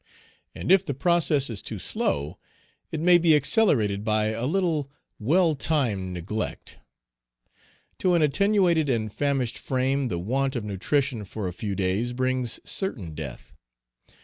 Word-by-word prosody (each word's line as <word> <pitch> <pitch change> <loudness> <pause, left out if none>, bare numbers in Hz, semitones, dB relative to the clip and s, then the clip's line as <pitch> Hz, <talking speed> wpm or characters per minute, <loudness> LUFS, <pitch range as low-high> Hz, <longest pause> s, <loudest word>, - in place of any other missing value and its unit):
And - - -2
if 190 -1 +6
the 140 - -4
process 155 -3 +2
is 115 -4 -5
too - - -6
slow, 70 +1 -2 0.5
it 160 - -3
may 175 +2 +5
be 165 -2 +5
accelerated 130 - +3
by 110 0 +1
a 115 +3 -2
little 160 -4 0 0.3
well 160 - +3
timed 125 -11 -1
neglect. 95 +5 -5 1.2
To 180 -1 +2
an 165 - +3
attenuated 175 -1 +2
and 110 -4 -1
famished 135 -4 -1
frame, 130 +1 0
the 90 - -2
want 130 +9 -1
of 120 - -2
nutrition 115 +4 -1
for 100 0 -5
a 90 - -4
few 100 +2 -4
days 100 +6 -1
brings 130 -1 -1
certain 110 - -4
death. 75 -5 -8
130 Hz, 145 wpm, -25 LUFS, 105-155 Hz, 1.2 s, if